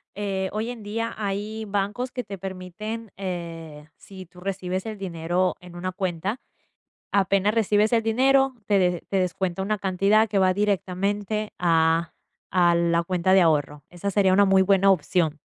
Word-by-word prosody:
eh, 195 Hz, -2 st, -2 dB
hoy 220 Hz, +3 st, -2 dB
en 235 Hz, -3 st, -9 dB
día 230 Hz, +2 st, -3 dB
hay 210 Hz, +2 st, -3 dB
bancos 205 Hz, +5 st, -2 dB
que 250 Hz, -, -4 dB
te 200 Hz, -2 st, -8 dB
permiten, 195 Hz, +4 st, -6 dB
eh, 165 Hz, -5 st, -6 dB
si 190 Hz, -1 st, -12 dB
tú 180 Hz, -, -17 dB
recibes 185 Hz, 0 st, -3 dB
el 215 Hz, -, -5 dB
dinero 180 Hz, -1 st, -1 dB
en 180 Hz, -1 st, -13 dB
una 185 Hz, +1 st, -3 dB
cuenta, 190 Hz, +4 st, -3 dB, 0.7 s
apenas 200 Hz, +1 st, +2 dB
recibes 215 Hz, 0 st, +2 dB
el 230 Hz, -1 st, +3 dB
dinero, 265 Hz, +4 st, +3 dB
te 205 Hz, -2 st, +3 dB
de 180 Hz, -2 st, +1 dB
te 195 Hz, -, 0 dB
descuenta 185 Hz, +1 st, -1 dB
una 210 Hz, +1 st, -1 dB
cantidad 200 Hz, +3 st, +2 dB
que 205 Hz, -, 0 dB
va 185 Hz, 0 st, +4 dB
directamente 205 Hz, +1 st, -1 dB
a 165 Hz, -1 st, +2 dB, 0.4 s
a 175 Hz, -2 st, +4 dB
la 170 Hz, 0 st, +2 dB
cuenta 180 Hz, +1 st, +1 dB
de 190 Hz, -, +6 dB
ahorro. 150 Hz, -3 st, +1 dB
Esa 180 Hz, +3 st, -4 dB
sería 195 Hz, -1 st, +3 dB
una 200 Hz, -, +5 dB
muy 190 Hz, -1 st, +4 dB
buena 195 Hz, 0 st, +4 dB
opción. 160 Hz, -3 st, +1 dB
190 Hz, 165 wpm, -24 LUFS, 180-210 Hz, 0.7 s, de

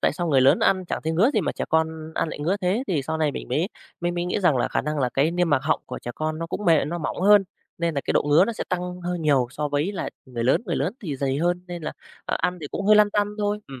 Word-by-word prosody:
tại -, -, +2 dB
sao 175 Hz, -2 st, -3 dB
người 135 Hz, -3 st, +4 dB
lớn 135 Hz, +2 st, +5 dB
ăn 185 Hz, -1 st, +2 dB
chẳng -, -, -3 dB
thấy 160 Hz, -, 0 dB
ngứa 210 Hz, -, +4 dB
gì 215 Hz, -, +3 dB
mà -, -, -1 dB
trẻ -, -, -3 dB
con 160 Hz, 0 st, -1 dB
ăn -, -, 0 dB
lại -, -, -6 dB
ngứa 170 Hz, +7 st, 0 dB
thế. 190 Hz, +7 st, +1 dB
Thì 160 Hz, -7 st, 0 dB
sau 160 Hz, +4 st, -3 dB
này 150 Hz, -2 st, +1 dB
mình -, -, -7 dB
mới -, -, 0 dB, 0.3 s
mới 175 Hz, 0 st, 0 dB
mới 175 Hz, 0 st, -2 dB
nghĩ 180 Hz, +3 st, -1 dB
rằng 165 Hz, -8 st, +3 dB
là 120 Hz, -, +1 dB
khả -, -, 0 dB
năng 150 Hz, 0 st, -3 dB
là 130 Hz, -, +1 dB
cái 145 Hz, +4 st, +3 dB
niêm 175 Hz, -1 st, 0 dB
mạc 140 Hz, -2 st, +3 dB
họng -, -, +1 dB
của -, -, -6 dB
trẻ 120 Hz, -, -6 dB
con, 155 Hz, 0 st, -3 dB
nó 165 Hz, -, -3 dB
cũng 200 Hz, +5 st, -5 dB
mề 165 Hz, -5 st, +4 dB
nó 170 Hz, +4 st, -3 dB
mỏng 160 Hz, -, -3 dB
hơn 205 Hz, +1 st, +6 dB, 0.3 s
nên 170 Hz, -1 st, 0 dB
là 140 Hz, -, 0 dB
cái -, -, 0 dB
độ -, -, +3 dB
ngứa 145 Hz, +5 st, +5 dB
nó 235 Hz, -, -2 dB
sẽ -, -, -4 dB
tăng 180 Hz, 0 st, -3 dB
hơi 175 Hz, 0 st, -3 dB
nhiều 140 Hz, -6 st, +2 dB
so 150 Hz, +2 st, -3 dB
với 145 Hz, +8 st, 0 dB
lại 190 Hz, -, -4 dB, 0.2 s
người 120 Hz, -3 st, -4 dB
lớn. 130 Hz, -, +3 dB
Người 170 Hz, -, -1 dB
lớn 160 Hz, +8 st, 0 dB
thì 150 Hz, -9 st, -4 dB
dày 135 Hz, 0 st, -1 dB
hơn 175 Hz, +2 st, 0 dB
nên 175 Hz, -2 st, -7 dB
là, -, -, -4 dB, 0.3 s
ờ, -, -, -1 dB
ăn 180 Hz, +1 st, 0 dB
thì 145 Hz, -, -5 dB
cũng 200 Hz, -, -3 dB
hơi 210 Hz, 0 st, +7 dB
lăn 210 Hz, -1 st, +5 dB
tăn 205 Hz, 0 st, +1 dB
thôi. 205 Hz, 0 st, 0 dB
Ừm, 135 Hz, -2 st, -10 dB
165 Hz, 315 wpm, -24 LUFS, 145-180 Hz, 0.3 s, hơi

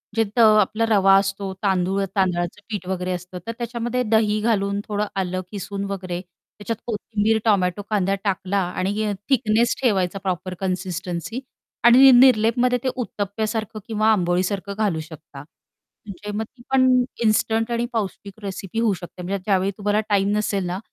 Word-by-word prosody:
जे 225 Hz, -, +3 dB
त -, -, +3 dB
आपला 215 Hz, 0 st, +4 dB
रवा 195 Hz, -2 st, +5 dB
असतो, 195 Hz, 0 st, -1 dB
तांदूळ 190 Hz, 0 st, +1 dB
तांदळाचं 180 Hz, 0 st, 0 dB
पीठ 200 Hz, -4 st, -5 dB
वगैरे 185 Hz, -1 st, -2 dB
असतं, 180 Hz, +1 st, -5 dB
तर -, -, -1 dB
त्याच्यामध्ये 240 Hz, +1 st, -2 dB
दही 215 Hz, -1 st, +3 dB
घालून, 200 Hz, -3 st, +1 dB
थोडं 210 Hz, 0 st, -1 dB, 0.2 s
आलं 185 Hz, 0 st, -2 dB
खिसुन 200 Hz, 0 st, -5 dB
वगैरे 180 Hz, -2 st, -4 dB
त्याच्यात 205 Hz, +4 st, -9 dB
कोथिंबीर, 220 Hz, 0 st, 0 dB
टोमॅटो, 200 Hz, -2 st, +2 dB
कांदा 195 Hz, -2 st, +1 dB
टाकला. 195 Hz, 0 st, 0 dB, 0.2 s
आणि 205 Hz, +3 st, -1 dB, 0.2 s
थिकनेस 235 Hz, -3 st, +2 dB
ठेवायचा, 195 Hz, -5 st, +1 dB
प्रॉपर 185 Hz, 0 st, -3 dB
कन्सिस्टन्सी. 180 Hz, -, -3 dB, 0.4 s
आणि 260 Hz, +3 st, +8 dB
निरलेपमध्ये 245 Hz, 0 st, +5 dB
ते 260 Hz, -, +1 dB
उत्तप्प्यासारखं 215 Hz, -1 st, -3 dB
किंवा 220 Hz, 0 st, +2 dB
आंबोळीसारखं 190 Hz, +1 st, 0 dB
घालू 200 Hz, -7 st, 0 dB
शकता. 155 Hz, -3 st, -10 dB, 0.6 s
म्हणजे 205 Hz, +1 st, -7 dB
मग 220 Hz, -, -1 dB
ती 240 Hz, +2 st, -17 dB
पण 260 Hz, -1 st, +4 dB, 0.4 s
इन्स्टंट 225 Hz, +1 st, +1 dB
आणि 235 Hz, 0 st, 0 dB
पौष्टिक 200 Hz, -2 st, -4 dB
रेसिपी 195 Hz, +2 st, -5 dB
होऊ 225 Hz, -3 st, +2 dB
शकते, 180 Hz, 0 st, -9 dB
म्हणजे 195 Hz, +3 st, -2 dB
ज्यावेळी 195 Hz, -1 st, +2 dB
तुम्हाला 205 Hz, +1 st, +1 dB
टाईम 200 Hz, -1 st, +2 dB
नसेल 200 Hz, -3 st, -1 dB
ना 180 Hz, +2 st, -3 dB
200 Hz, 150 wpm, -22 LUFS, 185-220 Hz, 0.6 s, आणि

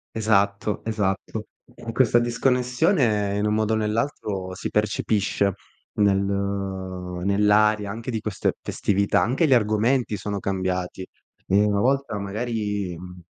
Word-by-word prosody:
Esatto. 100 Hz, -1 st, +1 dB
Esatto. 105 Hz, -4 st, -2 dB, 0.3 s
E 115 Hz, -, -7 dB
questa 120 Hz, 0 st, +4 dB
disconnessione 125 Hz, -, +1 dB
in 105 Hz, -, 0 dB
un 105 Hz, -, +1 dB
modo 110 Hz, 0 st, +1 dB
o -, -, +3 dB
nell'altro 105 Hz, -4 st, -2 dB
si -, -, -4 dB
percepisce 105 Hz, -2 st, 0 dB, 0.4 s
nel 100 Hz, -2 st, +4 dB
nell'aria 100 Hz, +1 st, 0 dB
anche 115 Hz, +3 st, -6 dB
di 110 Hz, -2 st, -2 dB
queste 105 Hz, -3 st, -1 dB
festività. 100 Hz, 0 st, +1 dB
Anche 135 Hz, +7 st, +2 dB
gli 135 Hz, -, +4 dB
argomenti 115 Hz, +1 st, +2 dB
sono 100 Hz, +1 st, -4 dB
cambiati. 95 Hz, -1 st, -2 dB, 0.4 s
Ehm, 100 Hz, +2 st, +4 dB
una 100 Hz, -1 st, +1 dB
volta 135 Hz, -4 st, +1 dB
magari, 105 Hz, -3 st, -3 dB
mhmm, 90 Hz, 0 st, -11 dB
105 Hz, 125 wpm, -24 LUFS, 100-115 Hz, 0.4 s, questa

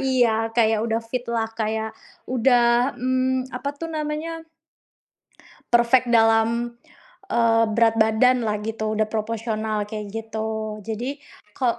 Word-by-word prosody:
iya, 235 Hz, -4 st, +1 dB
kayak 220 Hz, -2 st, +3 dB
udah 225 Hz, 0 st, 0 dB
fit 245 Hz, +2 st, -4 dB
lah, 225 Hz, -1 st, -1 dB
kayak 220 Hz, 0 st, -1 dB, 0.4 s
sudah, 245 Hz, 0 st, +3 dB
mmm, 255 Hz, +1 st, 0 dB
apa 250 Hz, +3 st, -4 dB
tuh 330 Hz, +2 st, -5 dB
namanya? 310 Hz, +2 st, -4 dB, 1.3 s
Perfect 240 Hz, +1 st, +4 dB
dalam, 230 Hz, +1 st, +3 dB, 0.6 s
eee, 230 Hz, -1 st, +3 dB
berat 225 Hz, 0 st, +3 dB
badan 225 Hz, +3 st, +3 dB
lah 210 Hz, -1 st, -1 dB
gitu, 220 Hz, 0 st, -3 dB
sudah 215 Hz, -, +2 dB
proporsional 215 Hz, -1 st, -2 dB
kayak 210 Hz, -1 st, -6 dB
gitu. 220 Hz, -1 st, -4 dB
Jadi 245 Hz, +7 st, -5 dB, 0.3 s
ko 240 Hz, -2 st, 0 dB
230 Hz, 120 wpm, -23 LUFS, 220-250 Hz, 1.3 s, Perfect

